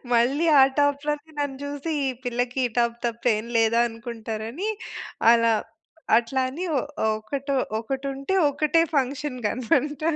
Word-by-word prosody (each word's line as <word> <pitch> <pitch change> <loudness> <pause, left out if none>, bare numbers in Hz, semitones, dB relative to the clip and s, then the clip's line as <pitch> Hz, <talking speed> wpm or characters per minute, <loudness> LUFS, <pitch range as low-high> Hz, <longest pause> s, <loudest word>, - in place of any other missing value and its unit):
మళ్ళీ 265 +8 +3
ఆ - - +9 0.2
టాప్‌లోనే 290 +2 0
నన్ను 280 -2 -2
చూసి, 290 +3 -4
ఈ - - +1 0.2
పిల్లకి 245 +1 -1
ఈ - - -2
టాప్ 235 0 +2
తప్ప, 235 0 -4 0.2
ఏం 215 - -6
లేదా 225 +1 +3
అనుకుంటారని, 230 - -5 0.6
అలా 230 -1 +4 0.7
అట్లా 260 +3 -1
అని 305 +8 -5
ఒ - - +2 0.2
ఒ - - +3
ఒకటొ 275 +5 -3 0.2
ఒకటుంటే 275 +6 -3 0.2
ఒకటే 305 +3 +2
ఫంక్షన్‌కి 260 -3 -1
అన్నమాట. 275 +5 0
265 Hz, 135 wpm, -25 LUFS, 235-285 Hz, 0.7 s, ఆ